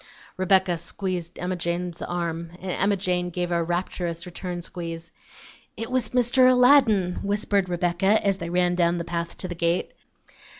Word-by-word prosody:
Rebecca 185 -2 +2
squeezed 180 -1 -4
Emma 180 +1 -2
Jane's 175 0 -3
arm, 170 -1 -3
and 185 0 -4
Emma 200 +3 +1
Jane 180 -1 -1
gave 175 0 -3
a 170 -1 +2
rapturous 175 0 -3
return 175 0 -6
squeeze. 165 -1 -7 0.7
"It 225 +1 -5
was 250 -4 0
Mr. 250 +1 +4
Aladdin," 250 -8 +4
whispered 200 -2 0
Rebecca, 175 +4 +2
as 195 -1 +1
they 170 - -4
ran 180 0 +2
down 175 -1 +2
the 170 - -2
path 170 0 -4
to 185 - -4
the 180 - -4
gate. 170 +1 -1
180 Hz, 160 wpm, -25 LUFS, 170-195 Hz, 0.7 s, Mr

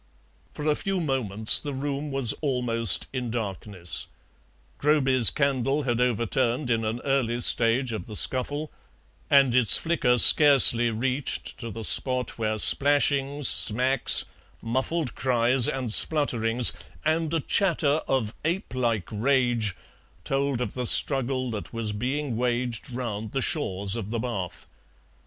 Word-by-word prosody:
For 150 - -7
a 155 - +2
few 195 +4 -3
moments 115 - +1
the 145 -2 -7
room 140 +2 -4
was 135 -5 0
almost 120 - 0
in 125 -2 -4
darkness: 100 -5 -5 0.7
Groby's 135 - +3
candle 135 +5 -1
had 120 -2 -2
overturned 125 +2 -1
in 115 -1 -1
an 110 +2 -4
early 130 -4 -1
stage 120 +1 +1
of 110 - -7
the 105 - -9
scuffle, 145 +7 -2 0.6
and 135 -3 +3
its 125 -4 +6
flicker 160 -7 0
scarcely 130 -4 +7
reached 125 +4 -3
to 115 - -7
the 115 +1 -8
spot 125 +1 +2
where 110 -1 -2
splashings, 140 +2 +2
smacks, 130 +5 +2 0.3
muffled 130 +5 -3
cries, 125 -1 +1
and 130 -4 -2
splutterings, 120 -6 +3 0.3
and 160 0 -1
a 165 - -1
chatter 160 -3 0
of 120 -5 -2
ape 170 +1 -3
like 115 -7 -2
rage 120 -3 0 0.5
told 135 0 -2
of 125 - -4
the 125 -1 -4
struggle 130 -2 +2
that 105 0 -7
was 115 -2 -4
being 130 +4 -4
waged 120 -1 -3
round 110 -4 -6
the 135 - -1
shores 100 - -2
of 110 -3 -6
the 115 - -4
bath. 110 -7 -6
125 Hz, 135 wpm, -24 LUFS, 115-140 Hz, 0.7 s, scarcely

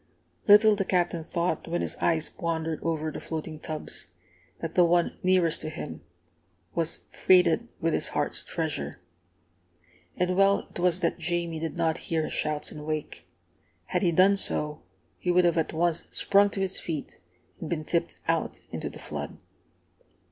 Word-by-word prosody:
Little 210 +1 +8
the 195 - 0
Captain 175 -3 0
thought, 170 +2 -1
when 170 +1 -1
his - - -2
eyes 160 -2 +1
wandered 165 -2 -1
over 160 -1 -1
the - - -6
floating 155 -1 -5
tubs, 155 0 -3 0.5
that 165 -1 -4
the 180 - +5
one 175 0 +2
nearest 180 -3 +3
to - - -3
him 115 - -7 0.7
was 165 -1 0
freighted 185 +4 +4
with 165 -2 +1
his - - +1
heart's 145 - -1
treasure! 160 - -3 1.2
And 180 0 +1
well 195 +1 +4
it - - -8
was 180 0 +2
that 170 - 0
Jamie 170 -1 -1
did 165 +2 -4
not 165 0 +1
hear 160 -1 +1
his - - -4
shouts 150 -1 -1
and 150 - -8
wake! 155 0 -4 0.6
Had - - -1
he 175 -4 +3
done 190 +4 +5
so, 150 -5 -1 0.4
he 180 - -3
would 180 0 +5
have 170 -1 +3
at 160 - -1
once 170 +1 0
sprung 200 +1 +3
to 200 - -5
his 190 -1 +1
feet 155 -4 -5 0.4
and 160 - -6
been 155 -3 -2
tipped 170 +1 0
out - - 0
into - - -4
the - - -11
flood. - - -6
170 Hz, 170 wpm, -27 LUFS, 160-180 Hz, 1.2 s, Little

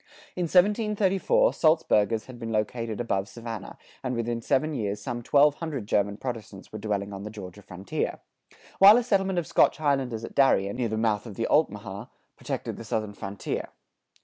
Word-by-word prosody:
[97:2] - - -30
In 180 - 0 0.5
1734, 210 - +2
Salzburgers 115 -9 +2
had 125 -2 -11
been 115 -1 -5
located 110 0 -2
above 100 -5 -1
Savannah, 115 -4 -7 0.3
and 130 -1 -2
within 115 0 -2
seven 150 +6 +1
years 105 -6 -2
some 120 - -4
twelve 145 +4 +4
hundred 150 -9 -4
German 100 -1 0
Protestants 110 -6 -7
were 110 - -5
dwelling 100 -1 -2
on 95 - -6
the 105 - -6
Georgia 105 -2 -9
frontier; 95 0 -4 0.6
while 200 +3 +9
a 245 - +1
settlement 195 -5 +1
of 175 - 0
Scotch - - +3
Highlanders 135 -7 0
at - - -10
Darien, 100 -7 +3
near 120 -3 -1
the 110 - -2
mouth 110 0 0
of 105 - -9
the - - -1
Altamaha, - - 0 0.3
protected - - -5
the - - -8
southern 110 -1 -3
frontier. 100 0 -5
115 Hz, 175 wpm, -26 LUFS, 105-140 Hz, 0.6 s, while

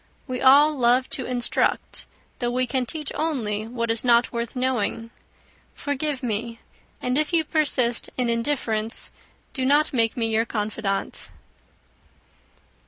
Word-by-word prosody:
We 255 -2 -4
all 285 +3 +6
love 250 0 +2
to 260 - -1
instruct, 245 -1 -1 0.3
though 240 - -1
we 255 +1 +1
can 250 0 -1
teach 305 0 -4
only 225 -9 -2
what 230 -1 -2
is 225 - 0
not 240 -1 +4
worth 235 +2 -3
knowing. 235 -3 -1 0.6
Forgive 285 -1 -2
me; 230 0 -3 0.4
and 250 +3 0
if 305 +2 0
you 330 -1 +4
persist 265 -7 +1
in 250 -1 0
indifference, 230 -2 -2 0.4
do 260 - -2
not 290 +3 +3
make 230 -2 +1
me 230 - +1
your 225 0 +1
confidante." 210 -3 -3
245 Hz, 135 wpm, -24 LUFS, 230-270 Hz, 0.6 s, all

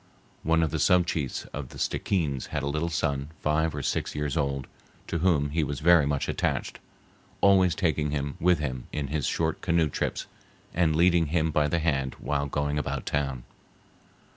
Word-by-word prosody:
One 80 +1 +2
of 80 - 0
the - - -1
sub 90 -1 +4
chiefs 75 -6 -2
of 70 -4 -5
the - - -11
Stickeens 75 -9 -1
had 75 -2 -3
a - - -1
little 75 +4 -1
son 70 -4 -1
five 75 +1 +1
or 75 - -4
six - - -2
years 75 0 -2
old, 70 -3 -1 0.4
to 85 - -2
whom 75 -5 +2
he 80 +1 +1
was 70 -1 -3
very 80 -2 +5
much 70 -1 -1
attached, - - -2 0.6
always 95 -4 +5
taking 80 -5 0
him 70 0 -2
with 90 0 +4
him 65 -4 -4
in 70 -3 -3
his 75 -1 -1
short 80 -1 -1
canoe 85 -3 +2
trips, - - -2 0.5
and 80 -2 +2
leading 85 0 +4
him 80 +1 +1
by 75 -1 +2
the 85 - 0
hand 70 -5 0
while 70 -1 -2
going 75 +1 -1
about 75 - -3
town. 70 -4 -2
75 Hz, 185 wpm, -27 LUFS, 70-85 Hz, 0.6 s, very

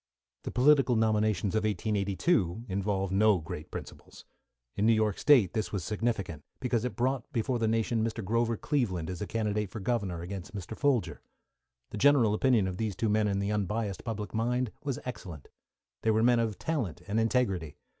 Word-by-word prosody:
The - - -2
political 135 -1 +4
nominations 110 -3 +1
of 110 0 +1
1882 105 - 0
involved 95 -1 -1
no 105 0 +4
great 80 -2 -7
principles. - - -10 0.5
In 105 - +1
New 115 - +6
York 110 -2 +1
State 125 - +5
this 110 - -2
was 100 -5 -2
significant, 105 - -2 0.2
because 125 -3 0
it 125 - -3
brought 130 0 -1
before 120 +2 -1
the 115 - +1
nation 115 0 +1
Mr. 115 -2 -3
Grover 115 +2 +1
Cleveland 95 - -1
as 90 - -6
a 105 - -3
candidate 105 -2 -1
for 110 - -7
Governor 95 -6 -2
against 95 +2 -7
Mr. 100 +2 -6
Folger. 140 -5 0 0.7
The 105 - -5
general 135 -6 +5
opinion 115 -3 +3
of 90 -1 -4
these 110 -3 -2
two 110 - 0
men 105 0 +2
in 100 -1 0
the 100 +1 -1
unbiassed 105 -1 -2
public 105 -4 -5
mind 120 +1 0
was 140 -4 -2
excellent. 90 - -7 0.5
They 110 - +1
were 110 0 +3
men 120 0 +4
of 110 -4 -1
talent 110 - -3
and 110 +2 0
integrity. 100 - 0
110 Hz, 180 wpm, -29 LUFS, 100-120 Hz, 0.7 s, New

